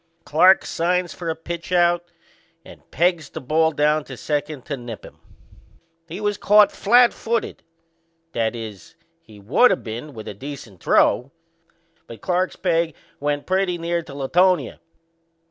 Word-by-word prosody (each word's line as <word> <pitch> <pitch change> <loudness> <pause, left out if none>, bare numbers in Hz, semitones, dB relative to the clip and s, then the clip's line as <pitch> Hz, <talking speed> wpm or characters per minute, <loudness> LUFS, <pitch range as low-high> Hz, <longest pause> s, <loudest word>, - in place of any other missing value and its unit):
Clarke 185 +6 +5
signs 175 +1 -1
for 170 -2 -5
a 160 - -1
pitch 170 +2 -7
out 175 -1 +3 0.6
and - - -15
pegs 170 -3 0
down 150 +1 +1
to 130 -3 -10
second 145 -2 -3
to 145 - -3
nip 120 -4 -9
him. - - -15 0.9
He 170 +4 -7
was 205 -1 -1
caught 210 0 +5
flatfooted 235 0 +2 0.7
that 115 -3 -1
is, 110 -6 -9 0.3
he 105 -2 -16
would 135 - +4
of 190 - -1
been 120 +6 -7
with 110 - -9
a - - -5
decent 115 - -10
throw; 125 +3 +3 0.8
but 115 - -10
Clarke's 185 0 -1
peg 165 -4 0 0.2
went 145 0 -2
pretty 185 -1 0
near 170 0 -2
to 140 -4 -12
Latonia. 165 +1 +1
160 Hz, 140 wpm, -22 LUFS, 135-180 Hz, 0.9 s, Clarke